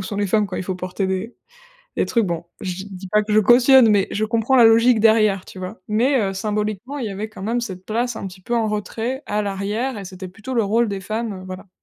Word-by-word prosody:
«Où - - -4
sont 200 +2 -5
les 205 0 0
femmes 210 +2 +2
quand 185 - -5
il - - -3
faut 185 - -3
porter 185 +2 -3
des 190 +5 -3 0.6
des - - +2
trucs?», 230 -4 +1
bon, 170 -1 -3 0.2
je 185 -1 -3
dis - - -11
dis 190 0 -8
pas 210 +3 +3
que 210 0 -3
je 215 - +6
cautionne 245 +2 +6
mais 205 -2 +3
je 215 - 0
comprends 230 +3 +1
la 245 - +7
logique 225 +1 +5
derrière, 215 -3 +3
tu - - -12
vois? 185 0 -7
Mais 245 +5 +2
heu, 195 -2 -1
symboliquement, 210 +6 -3
il 245 - -3
y - - -4
avait 205 +3 -5
quand 215 - -11
même 230 +4 -1
cette 190 -6 -7
place 235 +3 -1
un - - -5
petit 185 0 -14
peu 235 +6 -3
en 225 -2 +1
retrait, 225 +5 -3
à 210 +1 -1
l'arrière 205 +5 -2
et 200 - -7
c'était 185 0 -8
plutôt 220 +7 -7
le 230 - +3
rôle 230 +4 +2
des 200 -1 -4
femmes, 220 +3 -3
heu, - - -11
voilà. 185 +1 -9
210 Hz, 270 wpm, -21 LUFS, 195-230 Hz, 0.6 s, la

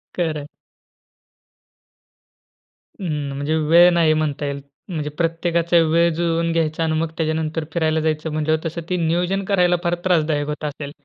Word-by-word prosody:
खरं. 155 -4 -2 2.6
हं. 150 -6 -3
म्हणजे 145 +3 -1
वेळ 175 +2 +8
नाही 165 -2 +4
म्हणता 150 -2 -1
येईल. 140 0 -4 0.3
म्हणजे 150 -4 -3
प्रत्येकाचा 170 +2 0
वेळ 170 +1 +4
ज 160 - -4
जुळवून 170 0 0
घ्यायचा 165 -1 0
आणि 160 -1 0
मग 165 -1 -2
त्याच्यानंतर 160 0 -1
फिरायला 160 -2 +1
जायचं 155 0 -1
म्हंटल्यावर 155 +1 -1
तसं 165 +1 -3
ते 180 - 0
नियोजन 180 +4 0
करायला 180 -3 +3
फार 175 0 +1
त्रासदायक 155 -4 +1
होत 150 0 -5
असेल? 145 -1 -5
160 Hz, 145 wpm, -21 LUFS, 155-170 Hz, 2.6 s, वेळ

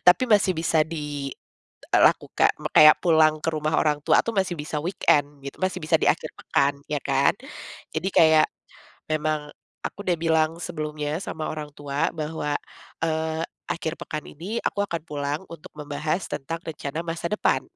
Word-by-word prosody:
Tapi 180 +8 +6
masih 205 -4 +4
bisa 160 0 +2 0.9
dilakukan. - - +3 0.2
Kayak 155 0 +9
pulang 155 -3 +4
ke - - +2
rumah 155 0 0
orang 150 -1 +2
tua - - +5
tuh 230 - -2
masih 190 -3 +1
bisa 150 0 -3
weekend 155 -5 +2 0.2
gitu. 140 - -9
Masih 185 - 0
bisa 155 - +3
di - - +1
akhir - - -6
pekan, 140 +1 +1 0.2
ya 150 - +1
kan. 140 0 +3 0.6
Jadi - - -1
kayak 160 -2 +6 0.6
memang 155 -1 -1 0.4
aku 205 - -5
udah 175 -2 +1
bilang 160 -1 +2
sebelumnya 155 -3 -3
sama 160 -5 -4
orang 150 -1 -5
tua 145 0 -1
bahwa, 155 -2 -3 0.5
eee, 160 0 -1 0.3
akhir 165 -3 -3
pekan 155 -1 -4
ini 185 +10 -6
aku 200 - 0
akan 170 -5 -4
pulang 145 0 -3
untuk 165 -2 -10
membahas 150 +4 -2
tentang 165 +5 -4
rencana 155 -1 -4
masa 165 0 -4
depan. 210 - +1
155 Hz, 155 wpm, -25 LUFS, 150-165 Hz, 0.9 s, Kayak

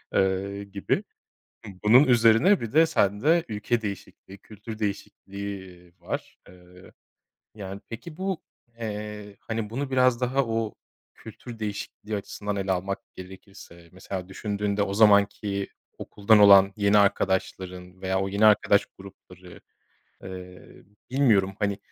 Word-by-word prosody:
ııı, 95 +1 0
gibi. 100 0 -2 0.8
Bunun 120 +7 +7
üzerine 120 - +4
bir 115 - -5
de 160 +3 +5
sende 145 - +2
ülke 110 +2 -2
değişikliği, 100 -1 -8
kültür 110 +2 -10
değişikliği 100 -3 -6
var. 85 - -6
Eee, 90 0 -17 0.6
yani 100 -2 -8
pek,i 155 +8 -9
bu, 190 -1 -3 0.4
eee, 105 -2 -6
hani, 110 -2 -4
bunu 135 +4 -4
biraz 130 -2 +3
daha 130 +2 +1
o 115 -1 -2 0.4
kültür 115 +2 -11
değişikliği 105 0 -5
açısından 100 0 -5
ele 95 -1 -1
almak 95 +2 -2 0.2
gerekirse, 95 -2 -13
mesela 95 0 -7
düşündüğünde 100 +1 -2
o 100 -1 -2
zamanki 100 -1 +3 0.3
okuldan 105 +1 +2
olan 100 -1 +7
yeni 100 0 +3
arkadaşların 95 -2 -1
veya 95 0 0
o 95 - -1
yeni 100 +2 +3
arkadaş 105 -1 +4
grupları, 95 -2 -14 0.6
eee, 90 -1 -11 0.3
bilmiyorum, 110 -8 +2
hani, 100 -1 -1
100 Hz, 120 wpm, -25 LUFS, 95-110 Hz, 0.8 s, Bunun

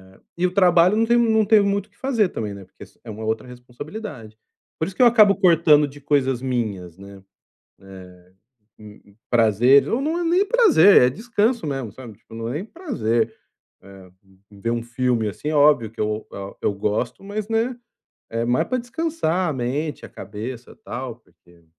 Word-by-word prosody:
eh, - - -24 0.2
e 180 - +1
o 180 - -1
trabalho 180 0 +4
não 225 +1 +2
tenho 240 +1 +4
não 220 -1 +3
tenho 210 0 +4
muito 200 +1 -1
o - - -36
que - - -34
fazer 230 -8 0
também, 105 -2 -5
né, 100 - -10
porque 95 - -15
s - - -19
é 115 - -11
uma 110 +1 -7
outra 110 +3 -3
responsabilidade. 125 - -10 0.4
Por 160 - 0
isso 195 - -8
que - - -1
eu 245 - +8
acabo 215 -4 +5
cortando 165 -6 +4
de 145 +1 -13
coisas 135 -3 0
minhas, 105 -9 -4
né, 100 -1 -13 0.6
eh, 95 -1 -12 0.8
hum, 105 -1 -14 0.3
prazer, 120 +4 +4
ou 235 - 0
não 315 +5 -1
é 350 - -2
nem 355 +4 +2
prazer, 405 - +6
é 125 - +5
descanso 225 - -1
mesmo, 135 -7 -4
sabe, 115 -4 -12
tipo, 115 - -15
não 115 0 -5
é - - -4
nem 165 +7 -4
prazer, 220 - -2 0.5
eh, 95 -1 -15 0.4
ver 105 +3 -5
um 120 0 -2
filme 120 -2 -1
assim, 125 +9 -6
é 155 - -1
óbvio 145 -7 +4
que 115 - -12
eu 105 0 -2 0.4
eu - - +1
gosto, 105 - -3
mas, 205 +1 -5
né, 225 +3 -1 0.5
é 115 +1 -2
mais 120 +1 0
pra 255 - -1
descansar 240 - -2
a - - -1
mente, 140 +4 -4
a - - -15
cabeça, 115 +4 -9
tal, 125 -2 -6
porque 85 -7 -26
135 Hz, 195 wpm, -22 LUFS, -, 0.8 s, eu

